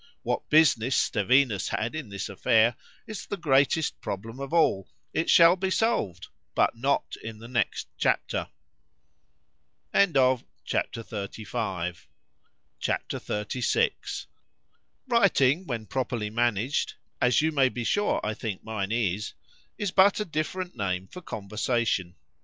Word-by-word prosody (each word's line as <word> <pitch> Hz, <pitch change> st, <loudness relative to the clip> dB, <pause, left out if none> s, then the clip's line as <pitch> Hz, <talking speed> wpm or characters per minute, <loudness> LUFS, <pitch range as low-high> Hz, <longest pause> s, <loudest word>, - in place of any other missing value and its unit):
What -, -, -2 dB
business 135 Hz, -5 st, +4 dB
Stevinus 115 Hz, -1 st, +2 dB
had 115 Hz, +2 st, -2 dB
in 155 Hz, -8 st, -5 dB
this 100 Hz, -1 st, -4 dB
affair,—is 115 Hz, -, 0 dB
the 200 Hz, -, -3 dB
greatest 145 Hz, 0 st, +2 dB
problem 115 Hz, +6 st, -5 dB
of 140 Hz, +1 st, -5 dB
all:——It 160 Hz, -, 0 dB
shall 170 Hz, +1 st, +7 dB
be 190 Hz, +1 st, -1 dB
solved,—but 185 Hz, -, -1 dB
not 135 Hz, +5 st, 0 dB
in 110 Hz, -1 st, -6 dB
the 115 Hz, +2 st, -11 dB
next 120 Hz, -1 st, -1 dB
chapter. -, -, 0 dB, 1.5 s
C -, -, +3 dB
H 200 Hz, -, +6 dB
A 130 Hz, -2 st, +4 dB
P. 110 Hz, -2 st, -5 dB, 1.4 s
XXXVI 105 Hz, +4 st, -1 dB, 0.8 s
WRITING, 190 Hz, -, +3 dB
when 115 Hz, -4 st, -3 dB
properly 120 Hz, -3 st, -2 dB
managed 120 Hz, +3 st, 0 dB, 0.3 s
(as 125 Hz, +3 st, +4 dB
you 160 Hz, -, +2 dB
may 135 Hz, -4 st, +3 dB
be 120 Hz, -1 st, -4 dB
sure 205 Hz, -, +1 dB
I 105 Hz, -, -1 dB
think 110 Hz, -3 st, -5 dB
mine 105 Hz, -3 st, -3 dB
is) 105 Hz, -3 st, -1 dB, 0.4 s
is 205 Hz, -3 st, -2 dB
but 200 Hz, +3 st, +5 dB
a 210 Hz, -, -1 dB
different 175 Hz, +3 st, -3 dB
name 95 Hz, -2 st, -2 dB
for 180 Hz, -, -9 dB
conversation. 110 Hz, -, -1 dB
120 Hz, 120 wpm, -27 LUFS, 110-155 Hz, 1.5 s, shall